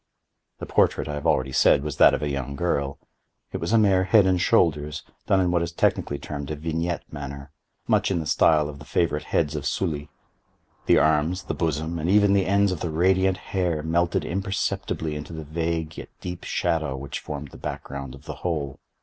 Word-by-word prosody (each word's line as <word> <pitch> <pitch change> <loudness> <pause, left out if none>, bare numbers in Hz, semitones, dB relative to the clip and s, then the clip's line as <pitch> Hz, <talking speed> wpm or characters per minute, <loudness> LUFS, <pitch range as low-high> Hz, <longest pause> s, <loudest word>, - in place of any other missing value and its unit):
The - - -6
portrait, - - +2
I 75 - -3
have 75 0 -3
already 65 0 +2
said, 70 +1 +4
was 75 -1 -4
that - - +7
of - - -4
a - - 0
young 70 0 -4
girl. 70 -4 -1 0.5
It - - -3
was 85 +5 -3
a 115 - +5
mere 95 -4 +4
head 100 +1 +5
and 90 -1 +2
shoulders, 75 -4 +2 0.2
done 95 - +4
in 90 -2 +2
what 85 -1 +2
is 85 0 -2
technically 70 -3 0
termed 70 -1 -6
a 75 - -2
vignette 80 +3 -2
manner; 70 0 -7 0.4
much - - +2
in 95 -3 0
the 80 - -4
style 75 0 +3
of 70 -1 -8
the - - -10
favorite 75 -1 0
heads - - 0
of - - -3
Sully. 75 -5 -2 0.8
The - - +6
arms, 80 +4 +2
the - - -3
bosom, 80 +1 -2
and 80 +3 -1
even 100 0 +5
the 100 -2 +2
ends 100 0 +3
of 90 - -3
the 85 - -3
radiant 95 +3 +2 0.2
hair 90 -5 0
melted 85 +2 +1
imperceptibly 95 -4 -2
into 75 +2 -7
the 80 -1 -6
vague 80 +1 -3
yet - - -9
deep 90 -1 -6
shadow 80 -6 -1
which 70 +1 -5
formed 75 -1 -6
the - - -13
back - - -5
ground 70 -1 -7
of 70 +2 -16
the - - -7
whole. 75 -6 -3
80 Hz, 210 wpm, -25 LUFS, 75-90 Hz, 0.8 s, that